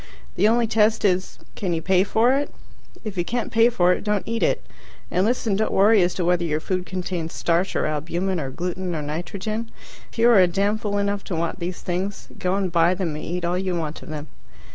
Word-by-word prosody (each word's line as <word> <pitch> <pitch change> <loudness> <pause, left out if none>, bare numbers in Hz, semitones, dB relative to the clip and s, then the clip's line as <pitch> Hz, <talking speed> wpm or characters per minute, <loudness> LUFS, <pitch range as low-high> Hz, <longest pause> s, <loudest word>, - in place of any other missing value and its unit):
The 210 - +4
only 235 +1 +3
test 220 0 +2
is, 185 -1 +1 0.2
can 185 -4 -2
you 160 - -2
pay 185 -1 +4
for 225 +5 +3
it? 285 +1 -1 0.5
If 210 -4 -6
you - - +2
can't 240 +6 -3
pay 230 +1 +5
for 180 -6 +3
it, - - -4
don't 210 -2 -1
eat 230 0 -2
it. - - +1 0.5
And 185 +3 +2
listen 230 -4 0
don't 220 +2 0
worry 205 +1 +5
as 175 0 +1
to 180 - -1
whether 175 0 +2
your 155 -2 0
food 185 +2 -3
contains 180 -3 -4
starch, 170 +3 0
or - - +1
albumen, 170 +5 -1
or 135 -3 -3
gluten, 180 +4 -3
or 150 - -3
nitrogen. 190 +9 -4 0.4
If - - -15
you 230 +1 +5
are 220 - +7
a 180 - +6
damn 200 +4 0
fool 205 -2 -2
enough 200 0 -1
to 180 - -3
want 165 +1 -2
these 175 +1 -4
things, 185 +3 -3
go 180 +1 0
and 195 -3 -1
buy 170 +1 +3
them 175 -5 -2
and 150 - -6
eat 175 +1 -3
all 175 +1 0
you 185 -1 -1
want 160 -2 -4
of - - -11
them. 150 -1 -5
185 Hz, 230 wpm, -23 LUFS, 175-210 Hz, 0.5 s, are